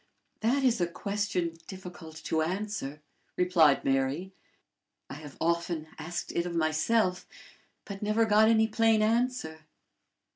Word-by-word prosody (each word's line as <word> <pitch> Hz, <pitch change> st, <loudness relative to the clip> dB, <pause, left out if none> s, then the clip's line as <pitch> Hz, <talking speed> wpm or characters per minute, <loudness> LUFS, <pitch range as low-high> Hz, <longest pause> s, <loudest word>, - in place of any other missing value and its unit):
"That 255 Hz, +5 st, +1 dB
is 245 Hz, -7 st, +2 dB
a 175 Hz, -, +2 dB
question 180 Hz, -3 st, -2 dB
difficult 180 Hz, -4 st, -10 dB
to 160 Hz, -, 0 dB
answer," 175 Hz, -4 st, -3 dB, 0.3 s
replied 170 Hz, -6 st, +4 dB
Mary. 135 Hz, +8 st, 0 dB, 0.8 s
"I -, -, -5 dB
have 145 Hz, -1 st, -10 dB
often 170 Hz, -1 st, -1 dB
asked 175 Hz, +2 st, -5 dB
it 170 Hz, +1 st, -1 dB
of 170 Hz, -, -5 dB
myself, 180 Hz, +5 st, +1 dB, 0.6 s
but 200 Hz, -1 st, -8 dB
never 215 Hz, +2 st, +2 dB
got 215 Hz, 0 st, +5 dB
any 220 Hz, -1 st, +4 dB
plain 225 Hz, -1 st, +3 dB
answer." 225 Hz, -9 st, -1 dB
180 Hz, 125 wpm, -29 LUFS, 160-215 Hz, 0.8 s, got